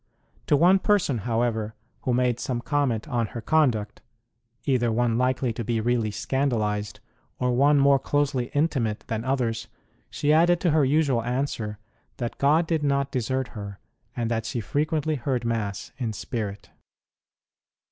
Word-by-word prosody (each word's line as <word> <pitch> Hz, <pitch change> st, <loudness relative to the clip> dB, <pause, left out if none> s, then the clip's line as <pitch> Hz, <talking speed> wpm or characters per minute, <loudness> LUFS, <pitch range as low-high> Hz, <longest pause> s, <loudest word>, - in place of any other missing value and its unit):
To 145 Hz, -, +4 dB
one 180 Hz, +5 st, +5 dB
person, 190 Hz, -, +2 dB
however, 115 Hz, -2 st, 0 dB, 0.3 s
who 125 Hz, -, +1 dB
made 125 Hz, -1 st, +1 dB
some 125 Hz, -2 st, -2 dB
comment 125 Hz, -2 st, 0 dB
on 120 Hz, -5 st, 0 dB
her -, -, -2 dB
conduct 120 Hz, -9 st, +1 dB, 0.6 s
either 125 Hz, -4 st, +2 dB
one 115 Hz, 0 st, +1 dB
likely 125 Hz, -1 st, +1 dB
to 115 Hz, -, -4 dB
be 115 Hz, +1 st, 0 dB
really 115 Hz, -1 st, +1 dB
scandalized, 105 Hz, -3 st, -1 dB, 0.4 s
or 125 Hz, 0 st, 0 dB
one 145 Hz, +3 st, +4 dB
more 140 Hz, 0 st, +5 dB
closely 140 Hz, -3 st, 0 dB
intimate 135 Hz, -8 st, 0 dB
than 115 Hz, -1 st, -2 dB
others 120 Hz, -4 st, -1 dB, 0.4 s
she 150 Hz, +1 st, +1 dB
added 170 Hz, +2 st, +4 dB
to 175 Hz, -, +2 dB
her 155 Hz, -1 st, +4 dB
usual 140 Hz, -3 st, +2 dB
answer 120 Hz, -4 st, -2 dB, 0.4 s
that 120 Hz, -2 st, -4 dB
God 155 Hz, +4 st, +4 dB
did 160 Hz, -1 st, 0 dB
not 140 Hz, -1 st, 0 dB
desert 130 Hz, +1 st, -1 dB
her, 100 Hz, -3 st, -7 dB, 0.4 s
and 115 Hz, -1 st, -2 dB
that 115 Hz, -1 st, -1 dB
she 125 Hz, -1 st, -2 dB
frequently 150 Hz, -, -1 dB
heard 125 Hz, -1 st, -2 dB
Mass 105 Hz, -4 st, -2 dB
in 115 Hz, -4 st, -2 dB
spirit. 105 Hz, -2 st, -5 dB
125 Hz, 150 wpm, -25 LUFS, 115-145 Hz, 0.6 s, one